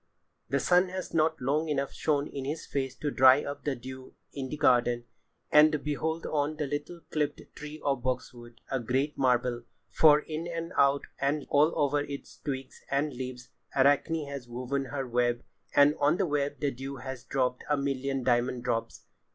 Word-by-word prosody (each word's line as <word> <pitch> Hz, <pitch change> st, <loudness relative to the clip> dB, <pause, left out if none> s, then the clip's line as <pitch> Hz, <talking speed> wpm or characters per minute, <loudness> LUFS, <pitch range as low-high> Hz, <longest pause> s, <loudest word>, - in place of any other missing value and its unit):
[Pg 135 Hz, -, 0 dB
89] -, -, +5 dB
The 135 Hz, -, -2 dB
sun 180 Hz, +1 st, +4 dB
has 185 Hz, 0 st, -6 dB
not 160 Hz, 0 st, +2 dB
long 150 Hz, +5 st, 0 dB
enough 140 Hz, -2 st, -1 dB
shown 145 Hz, -2 st, 0 dB
his 140 Hz, +2 st, -5 dB
face 135 Hz, -2 st, -3 dB
to 145 Hz, -, -3 dB
dry 130 Hz, +2 st, +6 dB
up 145 Hz, -, -6 dB
the 145 Hz, -2 st, 0 dB
dew 130 Hz, +1 st, -10 dB, 0.2 s
in 135 Hz, -2 st, -4 dB
the 150 Hz, -, -4 dB
garden, 120 Hz, -4 st, +3 dB, 0.5 s
and 150 Hz, 0 st, +6 dB
behold 160 Hz, +3 st, -2 dB
on 150 Hz, 0 st, -1 dB
the 150 Hz, -, -1 dB
little 145 Hz, +4 st, -5 dB
clipped 150 Hz, -1 st, -1 dB, 0.2 s
tree 150 Hz, +1 st, -8 dB
of 135 Hz, -3 st, +1 dB
boxwood, 120 Hz, -2 st, -4 dB
a 135 Hz, -, +1 dB
great 130 Hz, +5 st, -1 dB
marvel! 125 Hz, -2 st, +1 dB, 0.3 s
For 150 Hz, -1 st, +6 dB
in 155 Hz, +2 st, -5 dB
and 165 Hz, 0 st, -5 dB
out, 140 Hz, 0 st, +4 dB, 0.2 s
and 140 Hz, +2 st, 0 dB
all 150 Hz, +3 st, +4 dB
over 145 Hz, 0 st, +2 dB
its 145 Hz, -1 st, -6 dB
twigs 135 Hz, -3 st, -5 dB
and 140 Hz, +1 st, 0 dB
leaves, 125 Hz, 0 st, -7 dB, 0.3 s
Arachne 145 Hz, +3 st, +3 dB
has 140 Hz, -3 st, -7 dB
woven 130 Hz, +3 st, -3 dB
her 135 Hz, 0 st, -4 dB
web, 120 Hz, 0 st, +1 dB, 0.3 s
and 145 Hz, +1 st, +7 dB
on 145 Hz, +4 st, +3 dB
the 195 Hz, -, +1 dB
web 145 Hz, -2 st, -1 dB
the 145 Hz, -2 st, +1 dB
dew 135 Hz, +2 st, -6 dB
has 130 Hz, -1 st, -7 dB
dropped 125 Hz, -2 st, -1 dB
a 150 Hz, -, +3 dB
million 135 Hz, -1 st, -1 dB
diamond 120 Hz, 0 st, +1 dB
drops. 120 Hz, -2 st, -3 dB
140 Hz, 185 wpm, -29 LUFS, 130-150 Hz, 0.5 s, and